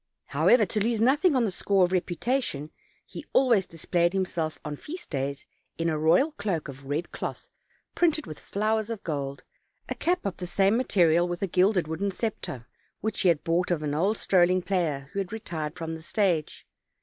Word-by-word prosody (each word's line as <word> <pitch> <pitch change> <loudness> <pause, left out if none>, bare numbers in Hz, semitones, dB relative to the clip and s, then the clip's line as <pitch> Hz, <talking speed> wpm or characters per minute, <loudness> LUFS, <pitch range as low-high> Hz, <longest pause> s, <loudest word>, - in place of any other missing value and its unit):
However, 240 -3 +4
to 210 - -2
lose 230 0 +1
nothing 290 +7 +4
on 250 -3 +3
the 205 - -1
score 190 +1 +2
of 175 - -4
reputation, 180 - -1 0.3
he - - -9
always 235 -8 +4
displayed 170 +1 0
himself 175 -5 -1
on 150 -1 -3
feast 330 - -9
days 140 -1 -3 0.3
in 165 0 0
a 155 -1 -1
royal 170 - +4
cloak 200 - -3
of 140 0 -10
red 150 +5 -2
cloth, - - -6 0.4
printed 320 -3 +2
with 155 - -8
flowers 215 +1 -1
of 225 -3 -5
gold, 140 -3 -4 0.5
a - - 0
cap 355 +2 -1
of 200 - -2
the 180 - -5
same 195 +4 +3
material, 175 -8 +3
with 175 +2 -4
a - - +1
gilded 180 -1 +2
wooden 165 +6 -1
scepter, 180 - -4 0.4
which 220 -1 -2
he - - +3
had 155 -3 +2
bought 170 +2 +1
of 170 -4 0
an 145 -1 -1
old 195 +8 +1
strolling 185 -1 +3
player, 165 -7 -1
who 200 - -2
had 195 0 -3
retired 165 -8 -4
from 165 -2 -4
the 160 - -7
stage. 175 -3 0
180 Hz, 190 wpm, -27 LUFS, 160-215 Hz, 0.5 s, However